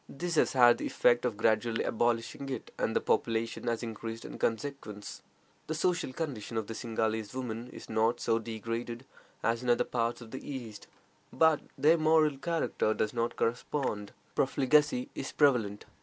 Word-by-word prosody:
This 175 +4 -4
has 155 - +3
had 120 -2 +6
the - - -2
effect 120 0 +3
of 115 -4 -1
gradually 115 +1 +2
abolishing 120 +4 0
it, 130 -4 -5
and - - 0
the - - +3
population 115 +1 0
has 115 0 0
increased 115 0 -6
in - - -8
consequence. 115 -4 -3 0.5
The 160 - -2
social 170 -3 0
condition 125 -7 -4
of 110 - -1
the 115 - -6
Singhalese 110 -1 -2
women 120 -2 -4
is - - -10
not 115 +2 +1
so 115 -1 +1
degraded 115 +2 -5 0.4
as 115 +1 +1
in 125 - -2
other 120 - +4
parts 115 -1 -1
of 115 -2 -11
the 130 - -6
East, 120 -7 -7 0.4
but 160 -2 +4 0.2
their 155 +4 +5
moral 155 -3 +4
character 165 -10 0
does 110 - -1
not 115 0 -1
correspond. 115 -3 -1 0.2
Profligacy 135 -1 +2
is 135 - -5
prevalent. 120 -9 +2
120 Hz, 165 wpm, -31 LUFS, 115-135 Hz, 0.5 s, had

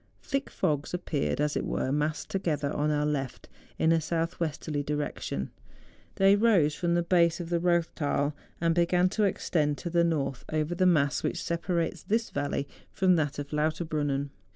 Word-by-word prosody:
Thick 275 0 -2
fogs 150 -5 -1
ap¬ 180 - -4
peared, 145 -2 -1
as 150 0 +1
it - - 0
were, 130 - -1
massed 150 +2 -1
together 155 -6 -1
on 150 +1 +1
our 150 0 +1
left, 135 -4 -3 0.3
in 160 - +3
a 165 -1 +3
south 165 +2 -2
westerly 155 -2 -2
direction. 145 - -3 0.6
They 195 +1 +5
rose 200 -9 +4
from 170 +1 0
the 175 - +2
base 170 -1 +3
of 175 -1 -6
the 170 - +2
Eoththal, 165 -4 +1 0.3
and 165 0 +2
began 175 +2 +3
to 210 +2 +1
extend 150 -6 0
to 170 - -5
the 170 0 +3
north, 140 -6 -1
over 155 +2 0
the 185 +1 +3
mass 145 -5 +3
which - - -2
separates 170 0 -1
this 225 +2 -1
valley 145 0 -2 0.2
from 185 -1 +3
that 150 -3 -1
of 145 -1 -5
Lauterbrunnen. 150 -2 -1
160 Hz, 175 wpm, -28 LUFS, 145-175 Hz, 0.6 s, They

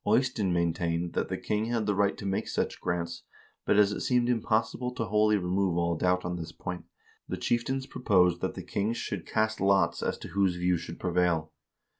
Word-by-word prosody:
Eystein 125 -7 +2
maintained 85 0 0
that - - 0
the - - -2
king 105 +1 -1
had 115 -2 -1
the 105 - +1
right 100 0 +1
to 100 - -7
make 95 0 -1
such - - -2
grants, 85 -1 -2 0.5
but - - +4
as 105 -1 +5
it - - -3
seemed 125 -1 +2
impossible 120 +1 0
to 120 -2 -3
wholly 105 +1 +3
remove 90 -1 0
all 85 0 +1
doubt 90 +2 +1
on 90 0 -2
this 80 -2 -6
point, 90 -1 -6 0.4
the - - -2
chieftains 130 +3 -1
proposed 90 -9 +2
that - - -2
the - - -6
kings 110 +4 -1
should 95 -5 -4
cast 110 -1 0
lots 95 -3 +3
as - - -1
to - - -9
whose 95 -2 +1
view 90 0 +1
should 85 0 -6
prevail. 85 -3 +1
95 Hz, 200 wpm, -29 LUFS, 85-110 Hz, 0.5 s, as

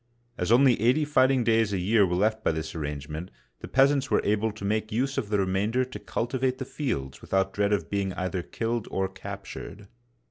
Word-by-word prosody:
As - - -1
only 125 -2 +5
eighty 130 +7 +3
fighting 135 -3 +3
days 115 -2 +2
a - - +1
year 100 +2 +3
were 90 - -1
left 110 +4 +1
by - - +3
this 80 0 -4
arrangement, 75 +2 -5 0.3
the - - -8
peas 135 +2 +5
ants 135 -1 -1
were - - +3
able 105 +2 +1
to 105 -1 -8
make 110 +2 -1
use 135 +5 0
of 110 -6 -5
the 105 - +2
remainder 100 +6 +1
to 130 - -8
cultivate 130 +2 -1
the 130 - -4
fields 70 - -4
without 95 0 0
dread 100 0 +1
of 105 - 0
being 100 -1 0
either 95 0 -2
killed 115 +4 -3
or 95 0 0
captured. 95 +1 -8
105 Hz, 205 wpm, -27 LUFS, 95-125 Hz, 0.3 s, only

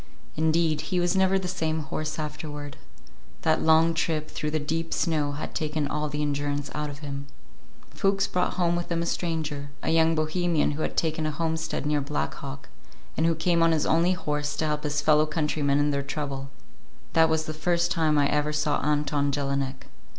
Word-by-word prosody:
Indeed, 160 -1 +2
he 185 -2 +1
was 175 +1 +1
never 190 0 +4
the 190 -1 -3
same 160 -3 -1
horse 155 +2 -4
afterward. 150 -2 -5 0.7
That 160 -1 +3
long 160 +1 +5
trip 160 -2 -1
through 150 - -2
the 155 +1 0
deep 165 +3 -2
snow 150 -3 0
had 150 - -5
taken 150 -1 -1
all 150 +1 -2
the 150 +1 -2
endurance 145 0 -2
out 150 0 -2
of 145 +1 -8
him. 140 0 -5 0.6
Fuchs 195 0 +1
brought 180 -3 0
home 175 -1 +2
with 175 0 -3
him 170 0 +1
a - - -2
stranger, 155 -5 -2
a - - +1
young 165 0 +4
Bohemian 160 +1 +1
who 150 +2 -4
had - - -2
taken 160 -1 +1
a - - 0
homestead 160 0 -2
near 150 0 +1
Black 145 +2 -2
Hawk, 135 -1 -8 0.5
and 160 - +2
who 165 - +2
came 170 +1 +2
on 165 0 +5
his 155 - +1
only 170 +3 +3
horse 150 -4 -2
to 160 - -1
help 150 0 -1
his 150 0 0
fellow 155 0 +4
countrymen 150 -2 +1
in 145 0 +2
their 140 0 0
trouble. 140 -1 -4 0.6
That 160 0 +5
was 160 0 +1
the 155 - -4
first 170 +2 +1
time 160 -3 +2
I 145 -1 +4
ever 150 +1 +1
saw 150 -1 0
Anton 145 -1 +1
Jelinek. 140 -1 -2
155 Hz, 195 wpm, -26 LUFS, 145-165 Hz, 0.7 s, long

